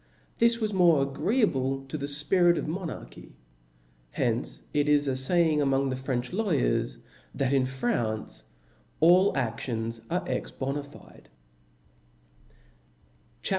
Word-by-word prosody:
This 235 Hz, 0 st, +3 dB
was 215 Hz, -2 st, -1 dB
more 170 Hz, -6 st, +4 dB
agreeable 135 Hz, -, 0 dB
to 135 Hz, -, -7 dB
the 140 Hz, -2 st, -3 dB
fpirit 170 Hz, +4 st, +3 dB
of -, -, -3 dB
monarchy. 160 Hz, -, -7 dB, 0.7 s
Hence -, -, -2 dB
itis 145 Hz, 0 st, +3 dB
a 135 Hz, -, +1 dB, 0.2 s
laying 165 Hz, -4 st, +3 dB
among 135 Hz, -1 st, +1 dB
the 130 Hz, -, -2 dB
French 130 Hz, +1 st, -3 dB
lawyers, 145 Hz, -, 0 dB, 0.4 s
that 135 Hz, -1 st, 0 dB
in 135 Hz, -2 st, +3 dB
France 120 Hz, -, -2 dB, 0.3 s
* -, -, -35 dB
allaSions 120 Hz, -, +2 dB
are 180 Hz, +2 st, -1 dB
ex 125 Hz, -, -2 dB
bona 140 Hz, +2 st, -3 dB
fide. 145 Hz, +1 st, -16 dB, 2.1 s
CHAP. -, -, -2 dB
140 Hz, 120 wpm, -27 LUFS, 130-175 Hz, 2.1 s, more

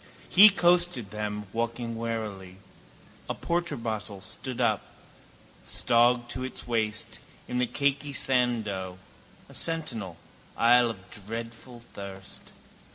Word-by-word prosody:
He 205 Hz, +3 st, +10 dB
coasted 175 Hz, -, +3 dB
them, 105 Hz, 0 st, -3 dB
walking 115 Hz, 0 st, -2 dB
warily. 110 Hz, -5 st, -4 dB, 0.7 s
A -, -, -1 dB
porterbottle 115 Hz, -, -3 dB
stood 130 Hz, +5 st, -4 dB
up, -, -, +2 dB, 0.8 s
stogged 120 Hz, 0 st, +3 dB
to 130 Hz, -, -4 dB
its 130 Hz, -, -6 dB
waist, 110 Hz, -2 st, 0 dB, 0.3 s
in 125 Hz, -, -1 dB
the 125 Hz, -, +2 dB
cakey 140 Hz, +2 st, 0 dB
sand 125 Hz, -4 st, +2 dB
dough. 95 Hz, -2 st, -4 dB, 0.5 s
A -, -, -15 dB
sentinel: 115 Hz, -, -3 dB, 0.4 s
isle 120 Hz, +1 st, +5 dB
of 95 Hz, -4 st, -9 dB, 0.2 s
dreadful 115 Hz, +2 st, -7 dB
thirst. 100 Hz, -4 st, -9 dB
115 Hz, 110 wpm, -28 LUFS, 105-130 Hz, 0.8 s, He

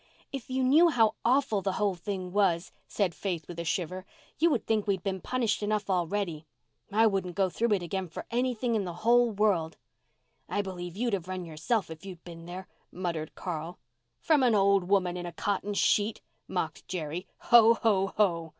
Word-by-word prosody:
"If 270 Hz, -4 st, -6 dB
you 260 Hz, 0 st, 0 dB
knew 310 Hz, +7 st, +6 dB
how 225 Hz, -7 st, +3 dB
awful 240 Hz, -5 st, +2 dB
the 195 Hz, -1 st, -1 dB
whole 205 Hz, 0 st, +1 dB
thing 185 Hz, 0 st, -5 dB
was," 190 Hz, -4 st, +2 dB, 0.2 s
said 195 Hz, -5 st, 0 dB
Faith 175 Hz, -5 st, -4 dB
with 170 Hz, -1 st, -7 dB
a -, -, -2 dB
shiver, 180 Hz, +2 st, -2 dB, 0.4 s
"you 335 Hz, +3 st, +5 dB
would 255 Hz, -, 0 dB
think 215 Hz, -2 st, 0 dB
we 200 Hz, -, +3 dB
had 180 Hz, -, -13 dB
been 190 Hz, -2 st, -2 dB
punished 235 Hz, -2 st, 0 dB
enough 210 Hz, -1 st, -1 dB
already. 175 Hz, -3 st, -1 dB, 0.4 s
I 220 Hz, +3 st, +4 dB
wouldn't 190 Hz, -4 st, 0 dB
go 190 Hz, -2 st, +1 dB
through 230 Hz, +2 st, +1 dB
it 190 Hz, -3 st, 0 dB
again 190 Hz, +1 st, -3 dB
for 165 Hz, -, -8 dB
anything 245 Hz, 0 st, 0 dB
in 215 Hz, -3 st, +1 dB
the 175 Hz, -2 st, -5 dB
whole 240 Hz, 0 st, +5 dB
world." 195 Hz, -7 st, +1 dB, 0.7 s
"I 205 Hz, -, 0 dB
believe 180 Hz, -2 st, -6 dB
you'd 240 Hz, 0 st, 0 dB
have 185 Hz, -3 st, -2 dB
run 185 Hz, -1 st, -4 dB
yourself 170 Hz, +5 st, -1 dB
if 160 Hz, +2 st, -9 dB
you'd 185 Hz, -3 st, -9 dB
been 165 Hz, -1 st, -10 dB
there," 185 Hz, +1 st, -7 dB, 0.2 s
muttered 170 Hz, -4 st, -4 dB
Carl. 170 Hz, -1 st, -5 dB, 0.4 s
"From 310 Hz, -3 st, +3 dB
an 245 Hz, -4 st, +4 dB
old 200 Hz, -2 st, +4 dB
woman 180 Hz, -2 st, +1 dB
in 175 Hz, 0 st, -5 dB
a -, -, -5 dB
cotton 205 Hz, +2 st, -2 dB
sheet," 210 Hz, +2 st, +2 dB, 0.3 s
mocked -, -, -3 dB
Jerry. 175 Hz, 0 st, -4 dB
"Ho, 230 Hz, -1 st, +6 dB
ho, 200 Hz, -4 st, +2 dB
ho!" 170 Hz, -6 st, +2 dB
195 Hz, 195 wpm, -29 LUFS, 175-220 Hz, 0.7 s, knew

